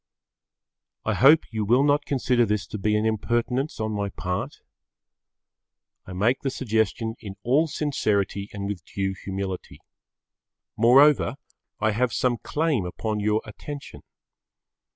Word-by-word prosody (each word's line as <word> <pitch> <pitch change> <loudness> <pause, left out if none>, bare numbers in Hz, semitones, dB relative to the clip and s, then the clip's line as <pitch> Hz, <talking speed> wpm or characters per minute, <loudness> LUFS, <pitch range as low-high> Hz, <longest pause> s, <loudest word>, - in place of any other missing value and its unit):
I - - +1
hope 150 +5 +6
you 110 -2 -2
will 120 +6 +4
not 145 0 +2
consider 125 -3 +2
this 105 -2 0
to 105 - -5
be 105 +2 +1
an 105 - 0
impertinence 120 +5 -1
on 110 0 -1
my 100 -1 -2
part. 90 -1 -4 1.5
I 95 - -7
make 110 +8 +1
the 135 - -1
suggestion 110 -2 -1
in 100 -2 -8
all 145 +7 +3
sincerity 105 - -1
and 100 -1 -5
with 100 -5 -5
due 95 +3 -3
humility. 95 -1 -6 1.0
Moreover 135 +5 +5 0.4
I 110 0 +2
have 120 +3 0
some 120 -3 +1
claim 150 - 0
upon 105 +4 -3
your 105 +1 +1
attention. 140 +6 -9
110 Hz, 130 wpm, -25 LUFS, 100-130 Hz, 1.5 s, hope